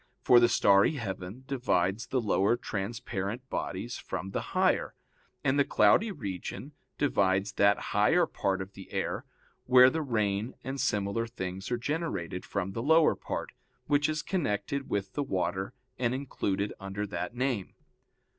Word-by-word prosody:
For 125 Hz, -, +7 dB
the 120 Hz, 0 st, +5 dB
starry 100 Hz, +3 st, +5 dB
heaven 100 Hz, -, -5 dB
divides 110 Hz, -6 st, 0 dB
the 130 Hz, -, 0 dB
lower 105 Hz, 0 st, +2 dB
transparent 115 Hz, +1 st, -4 dB
bodies -, -, -3 dB
from 95 Hz, -, -5 dB
the -, -, -2 dB, 0.2 s
higher, -, -, +2 dB, 0.5 s
and 135 Hz, +2 st, +2 dB
the -, -, +6 dB
cloudy 140 Hz, -, +4 dB
region 105 Hz, -, -6 dB, 0.3 s
divides 100 Hz, -7 st, +2 dB
that 100 Hz, +1 st, +4 dB, 0.2 s
higher -, -, +4 dB
part 95 Hz, -1 st, -1 dB
of 95 Hz, +1 st, -14 dB
the 95 Hz, -, -12 dB
air, -, -, -2 dB, 0.4 s
where 125 Hz, 0 st, +7 dB
the 160 Hz, -, -1 dB
rain 110 Hz, -4 st, -1 dB
and 135 Hz, 0 st, -3 dB
similar 105 Hz, -2 st, 0 dB
things 95 Hz, -4 st, -5 dB
are 120 Hz, -, 0 dB
generated, 120 Hz, -, -3 dB
from 95 Hz, -1 st, -2 dB
the 115 Hz, -, -4 dB
lower 160 Hz, +4 st, +5 dB
part, -, -, -5 dB, 0.3 s
which 145 Hz, +1 st, +2 dB
is 155 Hz, -1 st, -2 dB
connected 140 Hz, -, -2 dB
with 95 Hz, -1 st, -2 dB
the 145 Hz, -, -1 dB
water 95 Hz, -6 st, -1 dB, 0.3 s
and 125 Hz, 0 st, +1 dB
included 105 Hz, -7 st, -2 dB
under 95 Hz, +1 st, -4 dB
that 90 Hz, +2 st, -4 dB
name. 125 Hz, -6 st, -2 dB
105 Hz, 150 wpm, -29 LUFS, 95-130 Hz, 0.5 s, For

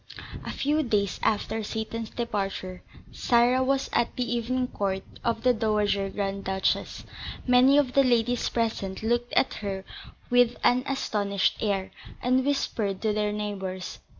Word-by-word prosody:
A -, -, -6 dB
few 300 Hz, +3 st, +1 dB
days 210 Hz, -8 st, 0 dB
after 220 Hz, +1 st, 0 dB
Seyton's 220 Hz, +1 st, -4 dB
departure, 195 Hz, -5 st, -3 dB, 0.3 s
Sarah 245 Hz, +2 st, +3 dB
was 270 Hz, +1 st, +1 dB
at 240 Hz, -, +1 dB
the 250 Hz, -1 st, -1 dB
evening 250 Hz, +2 st, 0 dB
court 195 Hz, -1 st, -2 dB, 0.2 s
of 230 Hz, -1 st, -1 dB
the 250 Hz, -1 st, +5 dB
Dowager 210 Hz, -3 st, +1 dB
Grand 195 Hz, 0 st, -3 dB
Duchess. 190 Hz, 0 st, -1 dB, 0.4 s
Many 255 Hz, +2 st, +6 dB
of 270 Hz, -4 st, +2 dB
the 275 Hz, -, +5 dB
ladies 245 Hz, -1 st, +2 dB
present 220 Hz, -4 st, -2 dB
looked 240 Hz, +2 st, 0 dB
at -, -, +3 dB
her 195 Hz, -2 st, -4 dB, 0.5 s
with 245 Hz, -1 st, +4 dB
an 250 Hz, +1 st, +4 dB
astonished 205 Hz, -7 st, 0 dB
air, 200 Hz, -3 st, -1 dB, 0.3 s
and 255 Hz, +1 st, +2 dB
whispered 220 Hz, -8 st, -1 dB
to 215 Hz, -1 st, +2 dB
their 210 Hz, 0 st, 0 dB
neighbours. 195 Hz, -3 st, -4 dB
225 Hz, 145 wpm, -27 LUFS, 200-245 Hz, 0.5 s, Many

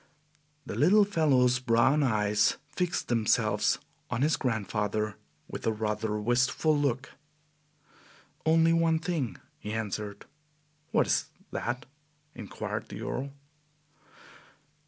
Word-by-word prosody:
The -, -, -5 dB
little 200 Hz, +7 st, +5 dB
fellow's 135 Hz, -9 st, +3 dB
brown 130 Hz, +4 st, +3 dB
eyes 105 Hz, -5 st, +2 dB
fixed 175 Hz, +2 st, -1 dB
themselves 115 Hz, -3 st, +2 dB, 0.3 s
on 125 Hz, -, 0 dB
his 155 Hz, 0 st, +3 dB
grandfather 110 Hz, -4 st, -1 dB, 0.3 s
with -, -, -6 dB
a -, -, +4 dB
rather 105 Hz, 0 st, -2 dB
wistful 125 Hz, +7 st, +2 dB
look. 140 Hz, -2 st, -1 dB, 1.3 s
"Only 165 Hz, +1 st, +4 dB
one 165 Hz, -1 st, +3 dB
thing," 160 Hz, -7 st, -2 dB, 0.2 s
he 105 Hz, -, -5 dB
answered. 105 Hz, -2 st, -4 dB, 0.6 s
"What -, -, +3 dB
is -, -, +1 dB, 0.3 s
that?" 120 Hz, +1 st, -3 dB, 0.5 s
inquired 105 Hz, -9 st, -5 dB
the -, -, -7 dB
Earl. 135 Hz, +2 st, -3 dB
125 Hz, 105 wpm, -29 LUFS, 110-155 Hz, 1.3 s, little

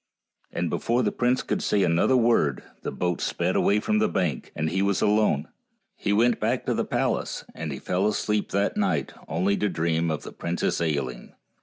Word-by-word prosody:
And -, -, -2 dB
before 120 Hz, +2 st, +1 dB
the 105 Hz, -, +1 dB
prince 125 Hz, +1 st, +1 dB
could -, -, -2 dB
say 100 Hz, -2 st, +2 dB
another 85 Hz, +10 st, +3 dB
word 115 Hz, -, +2 dB, 0.2 s
the -, -, -4 dB
boat 90 Hz, -1 st, -2 dB
sped -, -, -1 dB
away 105 Hz, +1 st, +3 dB
from 215 Hz, -, +1 dB
the 215 Hz, -1 st, +2 dB
bank, 80 Hz, -8 st, -1 dB
and 80 Hz, +1 st, -1 dB
he 95 Hz, -, -2 dB
w 100 Hz, +1 st, +2 dB
r -, -, +3 dB
as 100 Hz, -, 0 dB
alone. 105 Hz, -8 st, +2 dB, 0.5 s
He -, -, -2 dB
went 115 Hz, +3 st, +3 dB
back 115 Hz, +4 st, 0 dB
to -, -, +1 dB
the -, -, 0 dB
palace, -, -, -1 dB
and 80 Hz, -1 st, -5 dB
he 70 Hz, -, -4 dB
fell 95 Hz, +7 st, 0 dB
asleep 105 Hz, 0 st, 0 dB
that 100 Hz, +1 st, 0 dB
night 205 Hz, -2 st, 0 dB
only 100 Hz, +3 st, +1 dB
to 105 Hz, -, 0 dB
dream 85 Hz, -1 st, 0 dB
of 80 Hz, -2 st, -2 dB
the -, -, -8 dB
Princess 85 Hz, 0 st, -2 dB
Ailinn. 70 Hz, -6 st, -2 dB
100 Hz, 205 wpm, -26 LUFS, 80-110 Hz, 0.5 s, another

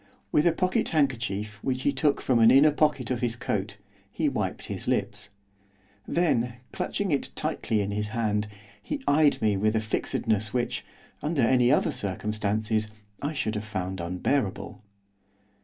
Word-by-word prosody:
With 150 Hz, +3 st, +4 dB
a -, -, +5 dB
pocket 185 Hz, +7 st, 0 dB
handkerchief 110 Hz, -8 st, -1 dB
which 130 Hz, -1 st, -1 dB
he 145 Hz, -, +3 dB
took 140 Hz, +1 st, +1 dB
from 125 Hz, -3 st, +2 dB
an 115 Hz, 0 st, +7 dB
inner 140 Hz, +4 st, +7 dB
pocket 145 Hz, -4 st, +1 dB
of 125 Hz, -, -1 dB
his 120 Hz, -2 st, 0 dB
coat, 105 Hz, -3 st, -3 dB, 0.3 s
he -, -, 0 dB
wiped -, -, -2 dB
his -, -, -6 dB
lips. 105 Hz, -, -1 dB, 0.8 s
Then, 125 Hz, -9 st, +1 dB, 0.2 s
clutching 200 Hz, -3 st, -2 dB
it 140 Hz, -, 0 dB
tightly 110 Hz, -2 st, -1 dB
in 100 Hz, 0 st, -2 dB
his 105 Hz, +1 st, -2 dB
hand, 105 Hz, -1 st, -1 dB, 0.3 s
he 290 Hz, -2 st, -4 dB
eyed 145 Hz, 0 st, +4 dB
me 105 Hz, -2 st, +3 dB
with 110 Hz, +3 st, +1 dB
a -, -, +3 dB
fixedness 110 Hz, 0 st, -1 dB
which, 120 Hz, -1 st, -1 dB, 0.4 s
under 150 Hz, -3 st, 0 dB
any 125 Hz, +1 st, +4 dB
other -, -, +3 dB
circumstances, 105 Hz, +2 st, -1 dB, 0.3 s
I 145 Hz, +2 st, -2 dB
should 110 Hz, -7 st, -1 dB
have 105 Hz, -1 st, -3 dB
found 95 Hz, -3 st, -4 dB
unbearable. 95 Hz, +8 st, -2 dB
115 Hz, 155 wpm, -27 LUFS, 105-140 Hz, 0.8 s, an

